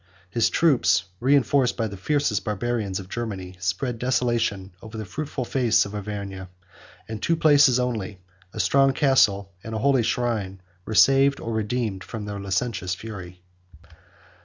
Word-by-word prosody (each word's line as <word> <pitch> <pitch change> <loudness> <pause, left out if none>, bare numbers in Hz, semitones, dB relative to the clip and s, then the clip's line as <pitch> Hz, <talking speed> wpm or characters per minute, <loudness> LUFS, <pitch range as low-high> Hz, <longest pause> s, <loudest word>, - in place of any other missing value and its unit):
His 115 +1 +2
troops, 115 - +3 0.2
reenforced 135 0 +2
by 115 - 0
the 100 -2 -5
fiercest 110 -1 0
Barbarians 105 -1 -2
of 95 - -9
Germany, 100 -4 -5
104 90 -1 -17
spread 110 +7 -2
desolation 120 -6 0
over 110 0 -9
the 110 - -5
fruitful 135 +5 -4
face 120 -3 +2
of 100 - -8
Auvergne; 100 -2 -6 0.6
and 110 -1 -6
two 165 - +2
places 145 -5 +5
only, 110 -6 -3 0.3
a 110 - -8
strong 135 +8 +3
castle 105 -8 +2
and 110 0 -6
a - - 0
holy 135 +3 +3
shrine, 110 -5 -1 0.3
were 110 - -3
saved 135 +8 +5
or 115 - -4
redeemed 110 -3 -2
from 110 -3 -7
their 105 -1 -5
licentious 95 -2 -2
fury. 90 -4 -9
110 Hz, 155 wpm, -24 LUFS, 95-125 Hz, 0.6 s, places